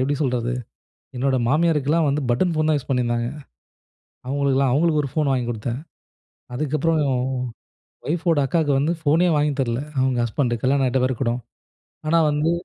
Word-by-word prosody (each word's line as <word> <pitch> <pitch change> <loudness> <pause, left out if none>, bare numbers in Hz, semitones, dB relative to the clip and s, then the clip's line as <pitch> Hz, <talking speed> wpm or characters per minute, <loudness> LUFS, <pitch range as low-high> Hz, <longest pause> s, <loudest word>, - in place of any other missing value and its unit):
எப்பிடி 135 +3 +1
சொல்றது? 125 -2 0 0.6
என்னோட 130 +1 +1
மாமியாருக்கெல்லாம் 155 0 +2
வந்து 145 +2 0
பட்டன் 170 +9 +2
ஃபோன் 155 0 +1
தான் 155 - +3
யூஸ் 135 - -12
பண்ணியிருந்தாங்க. 120 -2 0 1.0
அவுங்களுக்குலாம் 135 -1 +1
அவுங்களுக்கு 155 +1 +2
ஒரு 140 - -4
ஃபோன் 150 -3 +1
வாங்கி 125 -2 0
கொடுத்தேன். 115 +2 -3 0.8
அதுக்கப்புறம் 155 +4 0 1.1
ஒய்ஃப்போட 165 -1 +1
அக்காவுக்கு 150 -1 +1
வந்து 155 +5 +1
ஃபோனே 160 +4 +3
வாங்கி 150 0 +2
தரல. 120 -2 0 0.2
அவுங்க 130 -1 +1
ஹஸ்பண்ட் 120 +1 -1
கல்யாணம் 135 +1 +2
ஆயிட்ட 130 +1 +1
பேருகூட. 130 -2 0 0.8
ஆனா 165 - +3
வந்து, 150 +3 +1
140 Hz, 140 wpm, -22 LUFS, 130-155 Hz, 1.1 s, தான்